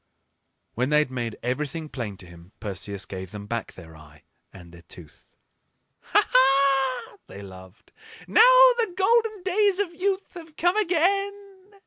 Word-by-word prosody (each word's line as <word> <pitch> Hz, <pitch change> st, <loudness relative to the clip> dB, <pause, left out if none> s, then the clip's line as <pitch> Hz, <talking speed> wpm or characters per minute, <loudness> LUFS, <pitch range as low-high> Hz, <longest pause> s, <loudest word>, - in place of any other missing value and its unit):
When 125 Hz, +3 st, -1 dB
they 150 Hz, -, +3 dB
had 150 Hz, -3 st, +1 dB
made 120 Hz, -3 st, -5 dB
everything 150 Hz, +5 st, -4 dB
plain 115 Hz, -9 st, -6 dB
to 95 Hz, -, -13 dB
him 85 Hz, +1 st, -16 dB
Perseus 100 Hz, -1 st, -6 dB
gave 95 Hz, -1 st, -8 dB
them 100 Hz, +1 st, -9 dB
back 115 Hz, +1 st, -5 dB
their 80 Hz, -3 st, -14 dB
eye 75 Hz, 0 st, -18 dB, 0.3 s
and 90 Hz, -3 st, -14 dB
their 85 Hz, 0 st, -15 dB
tooth. 85 Hz, -1 st, -14 dB, 0.6 s
"Ha! -, -, +1 dB
ha!" 270 Hz, 0 st, +2 dB
they 100 Hz, -, -11 dB
laughed; 95 Hz, -1 st, -14 dB, 0.4 s
"now -, -, +4 dB, 0.4 s
the 445 Hz, -5 st, 0 dB
golden 435 Hz, 0 st, +1 dB
days 390 Hz, +1 st, +1 dB
of 395 Hz, -4 st, -2 dB
youth 385 Hz, +3 st, -3 dB
have 330 Hz, -3 st, -12 dB
come 350 Hz, +3 st, +1 dB
again!" 395 Hz, +1 st, -1 dB
150 Hz, 150 wpm, -24 LUFS, -, 0.6 s, now